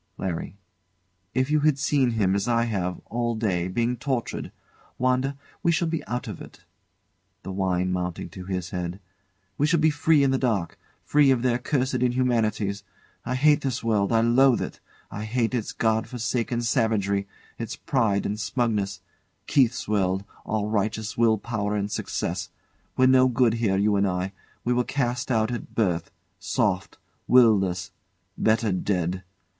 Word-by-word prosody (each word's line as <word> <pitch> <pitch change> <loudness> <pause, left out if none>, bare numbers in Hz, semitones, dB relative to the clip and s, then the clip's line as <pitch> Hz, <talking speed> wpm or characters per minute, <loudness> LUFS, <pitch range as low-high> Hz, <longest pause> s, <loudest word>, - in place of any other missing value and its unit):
LARRY. 90 0 -4 0.8
If 130 +3 +1
you 155 - +4
had 150 -1 +3
seen 140 -2 +2
him, 100 -4 +2
as 100 +2 0
I 115 -1 +2
have, 95 -6 -2
all 120 0 -1
day, 95 -6 0
being 120 +6 0
tortured. 125 -1 -3 0.5
Wanda, 130 +2 +1 0.2
we 170 - +3
shall 170 +1 +1
be 165 -1 -2
out 125 +3 -3
of 105 -6 -7
it. - - -13 0.8
[The 95 - -5
wine 95 -1 0
mounting 90 -1 -3
to 90 +2 -9
his 90 -2 -4
head] 90 0 -4 0.6
We 145 - +3
shall 170 +1 +3
be 155 0 +4
free 150 0 +3
in 135 - +3
the 135 - +1
dark; 105 -10 -1 0.2
free 145 -1 +4
of 130 -2 +2
their 125 -1 +2
cursed 130 0 0
inhumanities. 115 -5 +1 0.4
I 125 - 0
hate 145 +2 +4
this 130 -3 -2
world 105 -3 +1
I 115 -1 +4
loathe 120 +2 +4
it! - - -7 0.3
I 105 - -5
hate 115 +2 0
its 115 -4 -2
God 110 0 0
forsaken 120 0 -2
savagery; 100 -4 +1 0.3
its 115 -2 -4
pride 110 -8 0
and 105 +1 -2
smugness! 105 -5 -1 0.4
Keith's 125 -3 +2
world 95 -2 +1 0.2
all 105 -1 -1
righteous 110 0 -1
will 115 -1 +3
power 105 -1 -2
and 100 0 -2
success. - - -3 0.5
We're 130 - +5
no 130 0 +6
good 125 -2 +3
here, 110 -4 +1
you 105 +1 +2
and 100 0 +2
I 90 +1 -2 0.3
we 125 - +1
were 125 0 +2
cast 125 -2 -2
out 110 -2 +1
at 120 - -6
birth 90 -7 0 0.3
soft, - - -1 0.3
will 120 -3 +7
less 90 -1 -3 0.4
better 110 -1 +2
dead. 90 -1 -1
115 Hz, 165 wpm, -25 LUFS, 100-125 Hz, 0.8 s, will